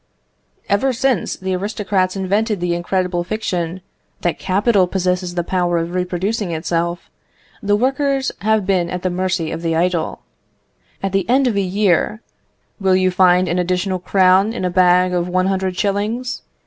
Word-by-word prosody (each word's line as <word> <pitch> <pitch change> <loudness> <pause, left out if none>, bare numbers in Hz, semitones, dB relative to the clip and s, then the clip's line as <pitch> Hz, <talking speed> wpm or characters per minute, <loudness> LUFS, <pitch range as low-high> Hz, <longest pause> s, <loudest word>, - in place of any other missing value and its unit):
"Ever 255 +7 +1
since 250 -5 0
the 190 0 -3
aristocrats 195 -1 -1
invented 200 +2 0
the 175 0 0
incredible 175 0 -1
fiction, 180 -3 -3 0.4
that 175 - -1
capital 195 0 +2
possesses 180 -1 -1
the 175 - 0
power 175 -1 0
of 170 +1 -3
reproducing 185 +2 -2
itself, 170 +1 -2 0.5
the 205 0 +2
workers 270 +3 0
have 215 -1 +1
been 185 -3 +1
at 180 0 -5
the 185 - 0
mercy 180 -2 -1
of - - -4
the 165 -1 -1
idle. 170 -1 -1 0.8
"At 195 - -1
the 195 +2 -1
end 265 +2 +4
of 240 -4 +1
a 200 - +2
year, 195 +2 +1 0.6
will 190 -2 +3
you 185 0 +2
find 180 0 +4
an 175 +1 0
additional 185 +1 -1
crown 190 +3 +3
in 210 - -3
a 180 - 0
bag 180 0 +4
of 175 0 -1
one 185 +1 +1
hundred 190 -1 -1
shillings? 215 +5 -1
185 Hz, 160 wpm, -19 LUFS, 180-205 Hz, 0.8 s, end